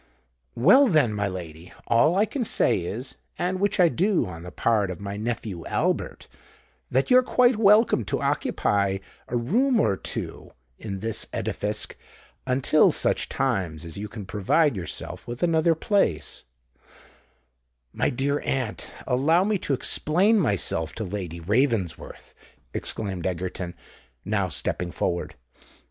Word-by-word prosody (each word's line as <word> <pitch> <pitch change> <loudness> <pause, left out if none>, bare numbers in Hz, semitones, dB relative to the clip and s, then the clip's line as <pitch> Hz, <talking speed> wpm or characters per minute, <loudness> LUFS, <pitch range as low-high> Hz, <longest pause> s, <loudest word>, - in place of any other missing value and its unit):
"Well 205 - +6
then, 150 - +3
my 100 -1 -1
lady, 85 -2 -8
all 150 +9 +3
I 205 +3 +4
can 260 +2 -3
say 210 - +2
is—and 130 - -5
which 200 0 0
I 180 - +7
do 185 +3 +1
on 85 -3 -8
the 90 - -8
part 105 0 +1
of 90 - -6
my 100 0 -5
nephew 105 -5 -4
Albert—that 65 - -3
you're 255 0 +8
quite 250 0 +3
welcome 210 - +5
to - - -1
occupy 100 -1 0 0.3
a 120 - -1
room 235 - +2
or 100 - +2
two - - -6 0.3
in 100 -3 -6
this 115 0 -3
edifisk - - -3 0.5
until 135 +4 +4
such - - 0
times 85 -4 -1
as 85 +3 -6
you 105 - -4
can 105 -1 -8
provide 110 - +2
yourself 90 -4 -6
with 120 +4 -5
another 165 -1 +3
place——" 160 - 0 1.5
"My - - +1
dear 140 +3 -1
aunt, 130 -5 -3 0.2
allow 145 +8 +3
me 205 0 0
to 145 - -1
explain 190 - +2
myself 95 - 0
to 110 - -4
Lady 90 -4 -5
Ravensworth," 105 - -1 0.4
exclaimed 95 -5 -2
Egerton, 90 0 -4 0.5
now 100 -2 0
stepping 90 +1 -2
forward. 85 0 -2
115 Hz, 135 wpm, -25 LUFS, -, 1.5 s, you're